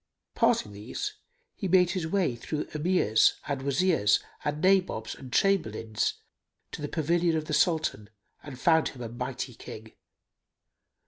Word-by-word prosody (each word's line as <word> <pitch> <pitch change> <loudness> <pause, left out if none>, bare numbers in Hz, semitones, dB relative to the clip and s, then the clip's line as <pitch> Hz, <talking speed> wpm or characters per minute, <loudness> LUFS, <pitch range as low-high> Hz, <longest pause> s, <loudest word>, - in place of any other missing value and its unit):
Passing 105 - +2
these, 105 - -5 0.4
he 195 - -3
made 180 -1 +4
his 185 -4 -2
way 175 -8 +1
through 150 +6 -4
Emirs 150 - +3
and 140 -2 -2
Wazirs 140 - +3 0.2
and 150 0 -2
Nabobs 185 - +2
and 130 -2 -11
Chamberlains, 115 - +1 0.6
to - - -7
the 145 - -2
pavilion 165 +1 +1
of 155 - -3
the 155 - -4
Sultan, 150 - +1 0.3
and 135 -4 -10
found 160 +2 +4
him 125 -2 -9
a 115 - -5
mighty 125 +2 -5
King. 110 0 -10
150 Hz, 140 wpm, -28 LUFS, 120-175 Hz, 0.6 s, made